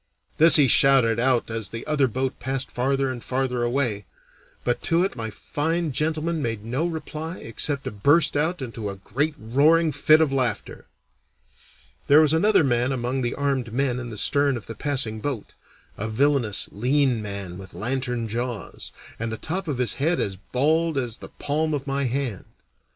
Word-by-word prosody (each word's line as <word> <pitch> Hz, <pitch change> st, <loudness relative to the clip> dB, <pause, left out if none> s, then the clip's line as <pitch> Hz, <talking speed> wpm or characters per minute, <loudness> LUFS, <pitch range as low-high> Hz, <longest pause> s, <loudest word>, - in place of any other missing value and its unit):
This 165 Hz, +2 st, +10 dB
he 145 Hz, -3 st, +7 dB
shouted 125 Hz, -3 st, +4 dB
out 125 Hz, -2 st, +1 dB
as 110 Hz, -3 st, -3 dB
the 115 Hz, +1 st, -7 dB
other 150 Hz, -3 st, +2 dB
boat 130 Hz, +2 st, -3 dB
passed 135 Hz, +2 st, -2 dB
farther 135 Hz, +1 st, 0 dB
and 120 Hz, -2 st, -7 dB
farther 130 Hz, -1 st, -1 dB
away, 120 Hz, -5 st, 0 dB, 0.6 s
but 120 Hz, -, -1 dB
to 170 Hz, +1 st, +3 dB
it 190 Hz, -, -2 dB
my 115 Hz, -3 st, -4 dB
fine 160 Hz, -, -2 dB
gentleman 160 Hz, +3 st, -1 dB
made 115 Hz, -4 st, -3 dB
no 130 Hz, +9 st, -1 dB
reply 160 Hz, +1 st, -6 dB
except 140 Hz, +5 st, -2 dB
to -, -, -4 dB
burst 145 Hz, +11 st, +3 dB
out 155 Hz, +1 st, 0 dB
into 115 Hz, -4 st, -5 dB
a 100 Hz, -, -6 dB
great 140 Hz, +11 st, -2 dB
roaring 150 Hz, +8 st, +3 dB
fit 155 Hz, +2 st, +4 dB
of 155 Hz, -4 st, +2 dB
laughter. 130 Hz, -3 st, -2 dB, 1.2 s
There 145 Hz, +2 st, +7 dB
was 155 Hz, -1 st, +5 dB
another 200 Hz, +2 st, +4 dB
man 125 Hz, -1 st, +1 dB
among 130 Hz, +1 st, -2 dB
the 120 Hz, -1 st, -2 dB
armed 135 Hz, -4 st, -1 dB
men 125 Hz, 0 st, 0 dB
in 120 Hz, -1 st, -6 dB
the 110 Hz, -, -8 dB
stern 140 Hz, +3 st, +2 dB
of 115 Hz, -, -10 dB
the 115 Hz, -, -7 dB
passing 115 Hz, -3 st, -2 dB
boat 120 Hz, -2 st, -5 dB, 0.5 s
a 110 Hz, +2 st, -3 dB
villainous, 120 Hz, -3 st, +1 dB
lean 125 Hz, +2 st, +1 dB
man 100 Hz, -3 st, -6 dB
with 95 Hz, -1 st, -12 dB
lantern 125 Hz, -1 st, -2 dB
jaws, 120 Hz, 0 st, -4 dB, 0.3 s
and 115 Hz, 0 st, -3 dB
the 110 Hz, -, -3 dB
top 180 Hz, -, -4 dB
of 145 Hz, -5 st, -2 dB
his 125 Hz, -2 st, +1 dB
head 165 Hz, +4 st, +1 dB
as 95 Hz, -, -2 dB
bald 155 Hz, -, 0 dB
as 120 Hz, -4 st, -2 dB
the -, -, -10 dB
palm 150 Hz, +2 st, -1 dB
of 140 Hz, -1 st, -5 dB
my 140 Hz, 0 st, -1 dB
hand. 125 Hz, -5 st, -3 dB
130 Hz, 180 wpm, -24 LUFS, 115-150 Hz, 1.2 s, This